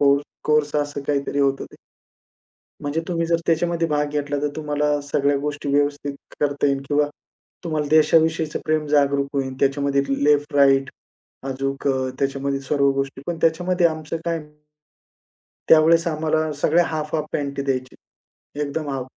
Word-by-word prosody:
Core 140 0 +4 0.2
course 150 -1 +2
असं 145 -1 -2
काहीतरी 140 -1 -1
होतं 135 -1 +1
ते. - - -14 1.1
म्हणजे 145 +3 -2
तुम्ही 170 -2 -1
जर 170 0 +2
त्याच्यामध्ये 170 0 +1
भाग 150 -1 0
घेतला, 145 -1 -2
तर 150 - +1
तुम्हाला 150 -1 0
सगळ्या 145 0 +1
गोष्टी 145 0 -4
व्यवस्थित 145 0 0 0.2
करता 145 -1 +1
येईल 140 -1 +1
किंवा 145 0 +2 0.6
तुम्हाला 155 -3 -2
देशाविषयीचं 160 0 +3
प्रेम 155 -1 +1
जागरूक 140 -1 +2
होईल. 135 -1 -1
त्याच्यामध्ये 140 0 +2 0.2
लेफ्ट 145 0 +2
राइट 135 -1 +4 0.6
अजून 135 +1 -3 0.3
त्याच्यामध्ये 140 0 -1
सर्व 140 0 +2
गोष्टी 135 0 -3
पण 170 -1 -2
त्याच्यामध्ये 175 +2 +2
आमचं 155 0 -4
काय 170 -1 0 1.3
त्यावेळेस 165 +2 +6
आम्हाला 155 0 0
सगळ्या 170 +3 +4
हाफ-हाफ 155 -1 -2
पँटी 140 -1 -2
द्यायची. 130 -2 -2 0.7
एकदम 150 +1 -3
हाफ. 130 -2 -3
145 Hz, 140 wpm, -22 LUFS, 140-155 Hz, 1.3 s, त्यावेळेस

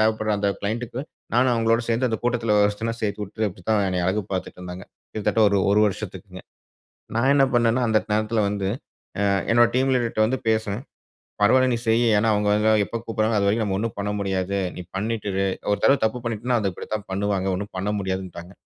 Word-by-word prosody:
தேவைப்படுற 110 0 +1
அந்த 100 0 +1
க்ளைண்ட்டக்கு 120 +4 -3 0.3
நானும் 125 +1 +4
அவுங்களோட 115 +1 +2
சேர்ந்து 120 +3 +1
அந்த 110 -2 -2
கூட்டத்துல 115 -3 +1
ஒருத்தனா 110 +3 -1
சேர்த்து 105 0 -2
விட்டு 110 +2 -3
அப்பிடித்தான் 105 +2 -1
என்னய 90 -1 -1
அழகு 105 +3 0
பார்த்துட்டுருந்தாங்க. 90 -1 -5 0.3
கிட்டத்தட்ட 110 +1 +1
ஒரு, 100 0 +2
ஒரு 105 +1 +4
வருஷத்துக்குங்க. 100 - -6 0.8
நான் 130 +4 +3
என்ன 135 -1 +5
பண்ணன்னா, 120 +1 +3
அந்த 110 - +4
நேரத்துல 110 +1 +1
வந்து 100 -1 -2 0.5
ஆ - - +1 0.3
என்னுடைய 120 0 +5
டீம் 130 +1 +2
லீடர்ட்ட 120 -3 -1
வந்து 130 +4 0
பேசுவேன். 110 +1 0 0.6
பரவால்ல 130 +5 +5
நீ 115 - 0
செய். 115 +2 +3 0.2
ஏன்னா 110 +2 +2
அவுங்க 105 0 +1
அங்க 110 +1 +3
எப்ப - - -8
கூப்பிடுறாங்ககளோ! 110 -1 0
அதுவரைக்கும் 100 +3 +2
நம்ம 95 -1 -1
ஒன்னும் 115 0 -3
பண்ண 100 +1 -2
முடியாது. 95 0 -1 0.2
நீ 90 - -6
பண்ணிட்டு 105 +1 -2
இரு! 95 +1 +1 0.3
ஒரு 100 - +2
தடவ 135 - +6
தப்பு 110 +3 +1
பண்ணிட்டன்னா, 120 +1 -1
அது 100 - 0
இப்பிடித்தான் 105 +3 -5
பண்ணுவாங்க. 100 0 -1
ஒன்னும் 100 +2 -5
பண்ண 100 +2 -2
முடியாதுன்னுட்டாங்க. 95 -1 -5
110 Hz, 185 wpm, -23 LUFS, 100-115 Hz, 0.8 s, தடவ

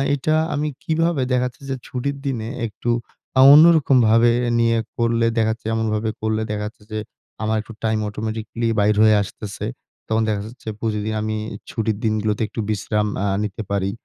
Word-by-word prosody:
এটা 155 +3 0 0.2
আমি 150 +1 -1 0.2
কিভাবে 165 -2 +1
দেখা 125 0 +2
যাচ্ছে 125 +3 -13
যে 135 - -1
ছুটির 140 +2 -3
দিনে 120 -5 -2 0.2
একটু 110 +3 -5 0.5
আ - - +9
অন্যরকমভাবে 130 -8 +6 0.3
নিয়ে 115 0 +3 0.2
করলে 115 0 +2
দেখাচ্ছে, 110 0 0
এমনভাবে 110 -1 0
করলে 110 0 0
দেখাচ্ছে 105 +1 -5
যে 110 - -2 0.4
আমার 110 0 +1
একটু 110 +1 -11
time 110 -1 +1
automatically 110 +2 -3
বাইর 105 +1 +3
হয়ে 110 -1 +6
আসতেছে? 100 0 -7 0.4
তখন 110 0 +1
দেখা 100 -1 -1
যাচ্ছে 120 -1 -15
প্রতিদিন 110 -1 -2
আমি 110 0 -2 0.3
ছুটির 110 -2 -1
দিনগুলোতে 110 -1 0
একটু - - -8
বিশ্রাম 105 0 0 0.2
আ - - +1 0.2
নিতে 105 +2 -4
পারি। 100 -1 0
110 Hz, 160 wpm, -21 LUFS, 110-120 Hz, 0.5 s, আ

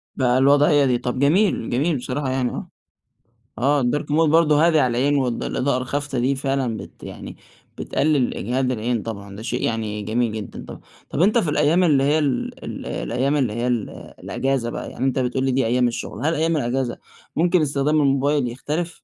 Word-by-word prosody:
بقى 125 -1 +2
الوضعية 145 +2 +4
دي، 125 -2 +2
طب 125 +1 -3
جميل، 160 - +2
جميل 145 +6 +1
بصراحة 130 +2 -3
يعني 130 -1 0
آه. - - -6 0.9
آه 140 +4 +2
الDark 135 +5 0
Mode 160 +1 +3
برضو 160 -1 +4
هادي 160 +1 +4
على 125 -4 +1
العين، 145 +3 +2
والض 125 -3 -1
الإضاءة 130 0 0
الخافتة 140 0 -3
دي 130 +3 +1
فعلًا 135 -4 -1
بت - - -11
يعني - - -9 0.4
بتقلل 145 -4 +1
إجهاد 130 +3 -1
العين 120 -1 -1
طبعًا، 100 -3 -7
ده 105 - -8
شيء 115 - -3
يعني 110 -2 -2
جميل 115 +2 0
جدًا 105 -3 -7
طبعًا، - - -10 0.3
طب 150 - -1
أنت 210 +6 +4
في 175 -9 +1
الأيام 150 +4 +3
اللي 145 -6 +3
هي 150 +3 +3
ال 140 -4 -2
ال - - -6
الأيام 135 +5 -1
اللي 125 -6 0
هي 120 +2 -2
ال 120 -4 -1 0.3
الأجازة 135 -3 -1
بقى، - - -6
يعني 130 - -3
أنت 135 0 +1
بتقول 130 +1 -1
لي 135 - +1
دي 130 -1 +1
أيام 125 +1 +2
الشغل، 120 +4 -5
هل 160 - +2
أيام 160 +1 +1
الأجازة 125 -2 -1 0.4
ممكن 175 +2 +3
استخدام 150 +1 +1
الموبايل 140 0 +2
يختلف؟ 155 +8 -4
135 Hz, 190 wpm, -22 LUFS, 120-150 Hz, 0.9 s, الوضعية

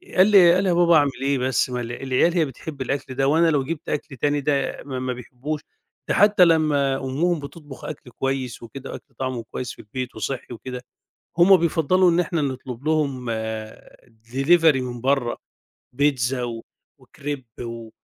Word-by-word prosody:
قال 185 +2 +6
لي 185 -5 +7
قال 185 +2 +2
لي: 190 - +1
"يا - - +3
بابا 170 -1 +5
أعمِل 145 -2 +4
إيه 140 0 +1
بس، 130 0 +1
ما 125 -1 -3
الع 120 0 -5
العيال 135 +6 +1
هي 165 -3 +2
بتحب 135 +2 -8
الأكل 135 0 -3
ده 135 0 +1
وأنا 165 +3 +4
لو 140 -3 +1
جِبت 160 +2 -5
أكْل 145 -1 -3
تاني 145 +3 +1
ده 140 -1 -1
ما 130 -2 -4
ما 130 0 -2
بيحبّهوش، 130 +5 -6 0.5
ده - - +1
حتى 205 -2 +6
لما 150 -4 +3
أمُّهم 150 +6 0
بتطبُخ 145 -1 -10
أكْل 135 -4 -8
كويس 130 -2 -3
وكده 135 +3 -8
وأكْل - - -11
طعْمه 130 -3 -3
كويس 125 -1 -4
في - - -20
البيت 125 +4 -6
وصِحّي 130 -2 -4
وكده، 125 +2 -7 0.6
هُم 185 +2 +7
بيفضّلوا 170 +2 +3
إن 170 - +2
إحنا 170 -2 0
نطلب 130 -2 -4
لهم 140 -6 0 1.0
delivery 140 +2 +4
من 120 -2 -5
برّه، 135 -2 +1 0.6
بيتزا 130 -2 +1
و 115 -1 -5 0.3
وكريب 140 -3 -7 0.2
و 115 -1 -7
140 Hz, 175 wpm, -23 LUFS, 130-160 Hz, 1.0 s, لي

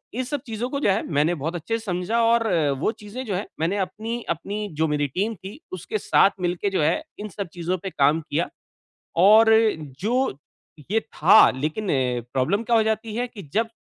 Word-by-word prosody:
ये 255 - -1
सब 290 +1 -3
चीज़ों 230 +2 -3
को 280 +1 -2
जो 245 - +1
है 195 - +2
मैंने 150 +4 +2
बहुत 160 +4 -2
अच्छे 225 +7 -2
से - - -13
समझा 180 +4 -1
और 230 0 +3 0.3
वो 190 - +1
चीज़ें 215 +5 -7
जो 205 -5 -2
है 195 - -3 0.2
मैंने 180 +5 0
अपनी 220 +5 -3
अपनी 205 +6 -3
जो 160 +1 +2
मेरी 145 -1 0
टीम 200 - -2
थी 195 - -10
उसके 185 +4 -4
साथ 200 -1 +4
मिलके 175 +3 -1
जो 190 -5 0
है 310 - +1 0.2
इन 210 - -5
सब 200 -1 -5
चीज़ों 175 +1 -2
पे 190 +2 -6
काम 150 0 +2
किया। 155 +2 -2 0.8
और 220 +3 +7 0.5
जो 240 - 0 0.5
ये 225 +2 +2
था 220 - +4 0.2
लेकिन 155 +10 -3 0.5
प्रॉब्लम 160 - +1
क्या 235 0 +2
हो 225 - +5
जाती 220 0 -2
है 245 +1 -1
कि 215 -5 -10
जब 225 +1 +1
205 Hz, 200 wpm, -23 LUFS, 175-225 Hz, 0.8 s, और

